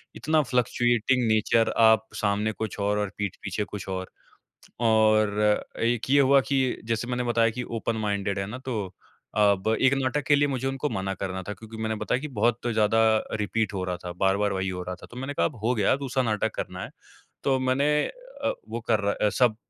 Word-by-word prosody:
इतना 155 0 +2
fluctuating 120 -1 +1
nature 110 +1 +3
आप 110 -1 +5
सामने 105 +1 0
कुछ 110 -1 -5
और, 100 +1 +1
और 105 - -1
पीठ 100 -3 -3
पीछे 100 +2 -2
कुछ 105 -1 -7
और। 95 0 -3 0.8
और 110 -1 +3 0.2
एक 120 +2 0
ये 140 - +6
हुआ 140 0 +5
कि 135 -1 +3 0.3
जैसे 115 +1 -1
मैंने 125 0 -1
बताया 115 -1 +2
कि 125 - -2 0.2
ओपन 115 0 -2
माइंडेड 100 -1 -1
है 95 - -2
ना 115 +6 -6
तो 130 -3 -3 0.6
अब 100 -1 +3
1 135 0 +4
नाटक 135 +2 0
के 145 - +5
लिए 145 0 +3
मुझे 130 -1 -2
उनको 135 +2 -2
मना 95 0 -2
करना 95 0 -4
था - - -2
क्योंकि 110 +3 -11
मैंने 110 0 -1
बताया 125 +4 -1
कि 150 - -5
बहुत 120 +2 +1
ज़्यादा 110 0 +3 0.4
रिपीट 110 +1 -1
हो 95 - -2
रहा 90 -1 -2
था, 90 - -4
बार-बार 95 +3 +1
वही 95 0 -1
हो 90 -1 -4
रहा 90 0 -5
था। - - -13
तो 120 - -12
मैंने 135 +3 -4
कहा 85 - +2
अब 100 - -5
हो 120 +2 +2
गया 105 -1 +3
दूसरा 135 -1 -1
नाटक 110 -2 -1
करना 90 0 -5
है। - - -9 0.5
तो 135 -1 +2
मैंने 130 +2 +1 0.2
अ, - - -5 0.2
वो 120 - -4
कर 110 -2 +3
रहा 100 0 +1
अ, 105 - +1
सब 115 -1 +2
110 Hz, 210 wpm, -26 LUFS, 100-125 Hz, 0.8 s, ये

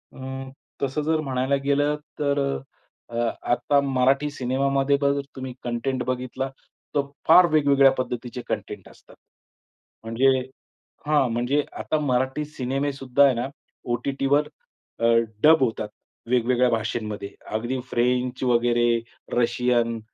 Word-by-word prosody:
अ, 130 0 -7 0.3
तसं 140 +2 -1
जर 160 +1 +1
म्हणायला 130 -1 0
गेलं 145 +1 +2 0.2
तर 140 -1 +1 0.7
अ, 120 - -8 0.4
आता 125 +4 +3
मराठी 135 +1 +2
सिनेमामध्ये 135 +1 +1
बघा 140 0 +3
जर 140 - -1
तुम्ही 130 -1 -6
कंटेंट 125 +2 -2
बघितला 130 +1 -2 0.5
तर 145 - +4 0.3
फार 180 +3 +8
वेगवेगळ्या 140 -3 +5
पद्धतीचे 125 -1 -4
कंटेंट - - -5
असतात. - - -19 0.9
म्हणजे 115 +4 +1 0.8
हां. 145 -4 +3
म्हणजे 125 +5 +1 0.2
आता 155 - -1
मराठी 130 +1 0
सिनेमेसुद्धा 135 -1 0
आहे 135 - +4
ना 120 +2 -2 0.5
ओ-टी-टीवर 140 +4 +1 0.5
अ, 115 - +1 0.4
डब 160 -2 +7
होतात. 110 -3 -1 0.4
वेगवेगळ्या 125 0 +3
भाषेंमध्ये 110 -3 -2 0.3
अगदी 120 +4 -2
फ्रेंच 125 +1 0
वगैरे, 120 -1 +3
अ, 115 - -11
रशियन, 120 -1 +1
130 Hz, 120 wpm, -24 LUFS, 120-140 Hz, 0.9 s, फार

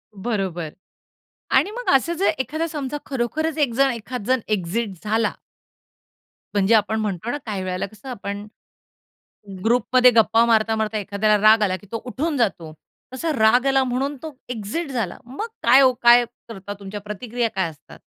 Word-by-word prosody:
बरोबर. 190 -6 -3 0.8
आणि - - +3
मग 485 +3 -7
असं 270 +6 +2
जे 390 - +2
एखादा 310 +6 -2
समजा 295 -3 -4
खरोखरच 300 +5 -2
एक 285 -5 +2
जण, 270 +2 +3
एखाद 235 -1 -5
जण 260 0 +2
एक्झिट 210 +2 -1
झाला 220 +2 +1 1.2
म्हणजे 205 +2 +3
आपण 220 +1 +1
म्हणतो 210 +1 -3
ना 290 - -2
काही 205 -4 -3
वेळेला 185 0 -2
कसं 215 +6 -12
आपण, 205 -3 -5 1.2
ग्रुपमध्ये 250 +2 +4
गप्पा 225 0 +4
मारता, 225 -1 +3
मारता 215 0 -1
एखाद्याला 210 +1 +1
राग 220 0 +5
आला 185 -3 +1
की 185 - -16
तो 230 - -4
उठून 290 +5 -2
जातो. 190 - -1 0.4
तसा 320 +6 -2
राग 245 0 +4
आला 270 0 +3
म्हणून 265 +3 -2
तो 315 -2 -7
एक्जिट 245 +7 -4
झाला. 225 -9 -3
मग 265 - -5 0.2
काय 255 +4 +6
ओ 260 -1 +5
काय 240 0 +7 0.2
करता? 205 -3 -7
तुमच्या 200 +1 -7
प्रतिक्रिया 230 +3 -3
काय 190 -3 0
असतात? 150 - -16
230 Hz, 160 wpm, -22 LUFS, 205-260 Hz, 1.2 s, काय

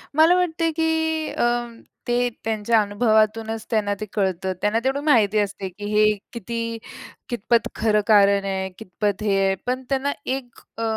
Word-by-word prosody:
मला 325 +3 +6
वाटते 330 -2 0
की 320 -1 0
अ, - - -1 0.6
ते 245 0 +1
त्यांच्या 220 +1 +1
अनुभवातूनच 220 +1 +1
त्यांना 210 -3 +1
ते 215 - -4
कळतं. 190 -2 -1
त्यांना 210 +2 +2
तेवढी 265 +2 0
माहिती 220 -8 +4
असते 200 -1 -2
की 205 +3 -9
हे 215 0 +5 0.2
किती, 230 +1 -4 0.5
कितपत 235 -1 +1
खरं 210 -1 +2
कारण 200 -2 +5
आहे, 190 -1 -2
कितपत 205 -1 -3
हे 200 -2 +2
आहे? 195 0 +2
पण 255 +1 -2
त्यांना 275 +1 0
एक 260 -2 -4 0.2
अ, - - -4
220 Hz, 155 wpm, -23 LUFS, 205-250 Hz, 0.6 s, मला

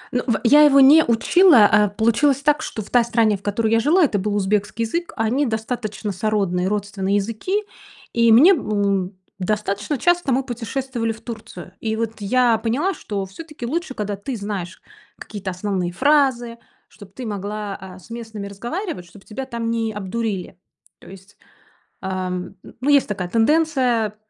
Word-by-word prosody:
Ну 250 - +2
в 230 - +1
я 290 +6 +6
его 285 -2 +6
не 290 +4 +8
учила. 240 - +5
А, 210 -1 +4
получилось 230 +7 +2
так, 295 +1 +2
что 220 -8 -5
в - - -15
той 245 -1 +4
стране, 230 -2 +2
в 195 - -10
которой 215 +2 -1
я 225 - +4
жила, 325 +9 +3
это 215 -8 +1
был 205 +2 -2
узбекский 205 +2 0
язык. 340 +10 -3
Они 245 +5 0
достаточно 220 -2 -4
сородные, 190 -2 -1
родственные 200 -1 -2
языки, 230 - -1 0.5
и 230 -1 +4
мне, 280 - +8
м, 200 - -1 0.2
достаточно 205 +6 -2
часто 350 -1 +1
мы 260 +2 +1
путешествовали 240 0 -3
в 220 - -15
Турцию. 215 -6 -9
И 220 -1 -2
вот 225 0 -2
я 235 +1 +2
поняла, 270 - 0
что 200 -2 -5
все-таки 295 +6 -9
лучше, 310 0 -3
когда 205 -1 -3
ты 220 +6 -6
знаешь 200 -3 -6 0.3
какие-то 200 -3 -7
основные 185 -1 -2
фразы, 255 -1 +1 0.3
чтоб 205 -3 -15
ты 250 +5 -8
могла, 205 -1 -4
а, 190 -1 -11
с 190 +5 -17
местными 225 -3 -7
разговаривать, 235 - -5
чтоб 195 +3 -17
тебя 265 +5 -6
там 235 -2 -3
не 225 -1 -1
обдурили. 195 -2 -4 0.4
То - - -15
есть, 195 +1 -15 0.7
а, 185 -1 -3
ну 185 +9 -5
есть 280 -5 +4
такая 185 -3 -4
тенденция 245 -4 +1
220 Hz, 165 wpm, -21 LUFS, 200-255 Hz, 0.7 s, не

